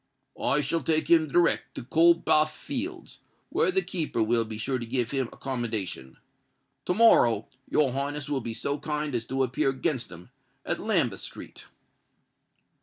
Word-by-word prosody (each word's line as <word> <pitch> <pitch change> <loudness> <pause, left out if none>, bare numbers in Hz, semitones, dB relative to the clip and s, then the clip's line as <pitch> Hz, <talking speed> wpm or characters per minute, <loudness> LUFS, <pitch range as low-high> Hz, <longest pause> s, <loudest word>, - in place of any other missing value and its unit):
I 150 - +2
shall 155 +4 -1
take 160 0 0
him 160 -2 +5
direct 170 +4 +1
to - - -6
Coldbath 160 +1 +4
Fields, 315 +7 -6 0.3
where - - +2
the 380 0 +1
keeper 155 - -1
will 115 +1 +2
be 110 -1 -7
sure 130 +4 -2
to 120 - -5
give 120 -1 -1
him 135 -3 0
accommodation. 110 - -4 0.7
To 180 - 0
morrow 120 - +5 0.2
your 145 -4 +2
Highness 145 +2 -3
will 140 -2 -1
be 115 -1 -5
so 140 +4 -2
kind 150 -1 -3
as 115 -1 -2
to 135 0 0
appear 130 +3 0
against 135 -1 -2
him 85 0 -12 0.3
at - - -1
Lambeth - - +1
Street." - - -10
135 Hz, 160 wpm, -27 LUFS, 120-155 Hz, 0.7 s, him